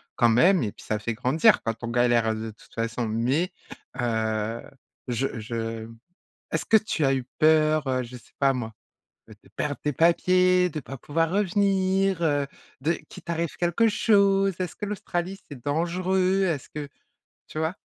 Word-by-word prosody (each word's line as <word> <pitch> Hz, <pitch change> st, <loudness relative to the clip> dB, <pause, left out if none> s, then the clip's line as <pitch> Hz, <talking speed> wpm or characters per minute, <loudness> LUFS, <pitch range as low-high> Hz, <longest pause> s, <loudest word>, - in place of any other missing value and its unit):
quand 120 Hz, -, +4 dB
même 170 Hz, -, +5 dB
et 105 Hz, -4 st, -1 dB
puis -, -, -15 dB
ça 105 Hz, -1 st, -1 dB
fait 115 Hz, +1 st, -3 dB
grandir 130 Hz, +7 st, +3 dB
quand 115 Hz, -, -1 dB
on -, -, -2 dB
galère, 120 Hz, -1 st, +2 dB
heu, -, -, -2 dB
de 110 Hz, 0 st, -5 dB
toute 105 Hz, -, -21 dB
façon. 115 Hz, 0 st, -2 dB
Mais 125 Hz, +11 st, 0 dB, 0.5 s
heu, 110 Hz, -1 st, -1 dB, 0.5 s
je 125 Hz, 0 st, -2 dB
je 115 Hz, 0 st, -4 dB, 0.6 s
est-ce 165 Hz, -, -2 dB
que 225 Hz, -, +6 dB
tu 185 Hz, -9 st, +1 dB
as 135 Hz, -, +3 dB
eu 130 Hz, -2 st, -2 dB
peur, 155 Hz, -1 st, +4 dB
heu, 130 Hz, -1 st, 0 dB
je 125 Hz, +1 st, -9 dB
sais -, -, -23 dB
pas 135 Hz, -1 st, +4 dB
moi, 115 Hz, -4 st, -5 dB, 0.6 s
heu, -, -, -11 dB
de -, -, -21 dB
perdre 145 Hz, -1 st, -2 dB
tes 150 Hz, -1 st, -1 dB
papiers, 180 Hz, +2 st, +4 dB
de 155 Hz, -1 st, -5 dB
pas 135 Hz, -, -8 dB
pouvoir 165 Hz, +5 st, 0 dB
revenir, 195 Hz, -2 st, +1 dB
heu, 145 Hz, -3 st, +2 dB, 0.4 s
de 160 Hz, +4 st, +1 dB, 0.2 s
qu'il -, -, -12 dB
t'arrive 170 Hz, -1 st, -3 dB
quelque 175 Hz, +6 st, +2 dB
chose? 200 Hz, -3 st, +3 dB
Est-ce 180 Hz, -3 st, -3 dB
que 210 Hz, -, -5 dB
l'Australie, 190 Hz, -2 st, -3 dB
c'est 135 Hz, -5 st, -10 dB
dangereux? 185 Hz, +5 st, +1 dB
Est-ce 160 Hz, -7 st, -1 dB
que 150 Hz, -1 st, -6 dB, 0.6 s
tu -, -, -13 dB
vois? 160 Hz, +4 st, -1 dB
155 Hz, 180 wpm, -25 LUFS, 120-185 Hz, 0.6 s, que